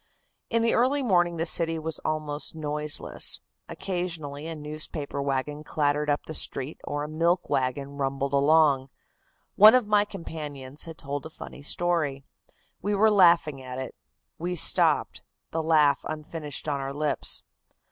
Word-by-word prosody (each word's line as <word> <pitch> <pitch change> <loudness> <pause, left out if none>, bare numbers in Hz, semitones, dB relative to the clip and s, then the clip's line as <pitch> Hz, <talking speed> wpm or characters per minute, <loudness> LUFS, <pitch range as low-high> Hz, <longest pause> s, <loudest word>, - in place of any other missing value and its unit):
In 230 -1 +1
the 230 - +2
early 270 +4 +2
morning 175 -6 +2
the 165 - 0
city 165 -1 +1
was 160 0 -3
almost 155 0 -3
noiseless. 150 -1 -1 0.3
Occasionally 165 -6 -4
a 165 - -5
newspaper 150 -1 -4
wagon 140 +2 -2
clattered 150 0 0
up 145 - 0
the 160 - -7
street 140 -1 -1
or 145 0 -3
a - - -4
milk 170 +3 0
wagon 135 +1 -1
rumbled 135 0 -2
along. 140 -2 +4 0.7
One 215 +4 +9
of 250 -3 +3
my 210 0 +3
companions 150 -7 -7
had 165 -1 -9
told 140 +2 -5
a - - -13
funny 150 - -10
story. 150 -3 0 0.6
We 205 +2 0
were 215 +2 +4
laughing 170 -8 +4
at 130 0 -7
it. 130 -2 -5 0.5
We 175 +2 -2
stopped 170 - +4 0.3
the 165 - -1
laugh 155 -3 +4
unfinished 155 -1 -5
on 145 -2 -1
our 135 0 -5
lips. 150 0 +2
155 Hz, 150 wpm, -26 LUFS, 145-170 Hz, 0.7 s, One